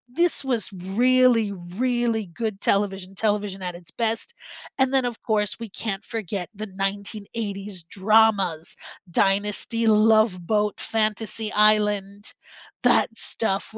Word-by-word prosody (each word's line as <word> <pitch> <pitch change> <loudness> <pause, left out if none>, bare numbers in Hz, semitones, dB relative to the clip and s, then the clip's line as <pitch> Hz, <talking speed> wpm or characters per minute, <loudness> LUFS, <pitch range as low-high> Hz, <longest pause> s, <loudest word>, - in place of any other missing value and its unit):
this 345 -2 +3
was 235 -7 0
really, 230 +4 +3 0.3
really 240 -3 +1
good 205 +3 -4
television 195 -2 0
television 205 -2 -1
at 180 -1 -4
its 170 -2 -10
best, 230 - -2 0.5
and 265 0 +3
then 265 -2 +3
of 240 -2 -4
course 210 -2 0
we 230 - -7
can't 200 0 -4
forget 200 -5 -4
the 215 +2 -5
1980s 200 0 -4
dramas, 195 -3 +2 0.4
Dynasty, 205 +5 +1
Love 215 -4 +4
Boat, 210 -1 0
Fantasy 215 0 -1
Island, 210 -1 +2 0.5
that - - +4
stuff 195 -3 -2
210 Hz, 120 wpm, -24 LUFS, 195-225 Hz, 0.5 s, Love